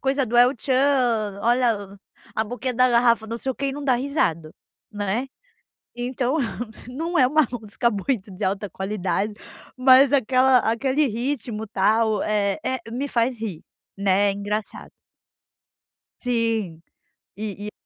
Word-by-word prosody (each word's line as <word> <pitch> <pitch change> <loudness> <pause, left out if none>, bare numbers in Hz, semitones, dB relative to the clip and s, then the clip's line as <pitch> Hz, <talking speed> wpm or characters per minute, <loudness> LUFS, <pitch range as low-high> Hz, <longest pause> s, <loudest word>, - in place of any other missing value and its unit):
coisa 275 0 +1
do 240 0 -2
é 245 +1 +8
o 255 - 0
tchan, 245 -5 +1
olha 225 -5 +1 0.4
a 220 - 0
boquinha 245 +3 -3
da 255 +1 +4
garrafa, 235 -2 +3
não 230 - -4
sei 265 - -3
o - - -18
que, 275 - -3
e 270 - -1
não 285 +1 -6
dá 260 - +3
risada, 240 - -1 0.4
né. 205 +5 -2 0.7
Então 250 +3 -1 0.5
não 330 +7 -2
é 255 - +6
uma 305 0 +3
música 235 0 -1
muito 205 0 -2
de 205 - -4
alta 200 +2 -1
qualidade, 195 +1 -2 0.4
mas 260 +2 +6
aquela 260 0 +4
aquele 260 +6 +1
ritmo 235 -2 -3
tal 215 +1 +2
é 205 -2 0
é 260 - -1
me 265 +4 -3
faz 240 -1 0
rir, 195 -8 -5 0.3
né, 200 0 +2
engraçado. 205 +1 -4 1.3
Sim, 225 -9 -1 0.6
e 205 -1 -5
e 210 - -6
235 Hz, 145 wpm, -23 LUFS, 205-260 Hz, 1.3 s, é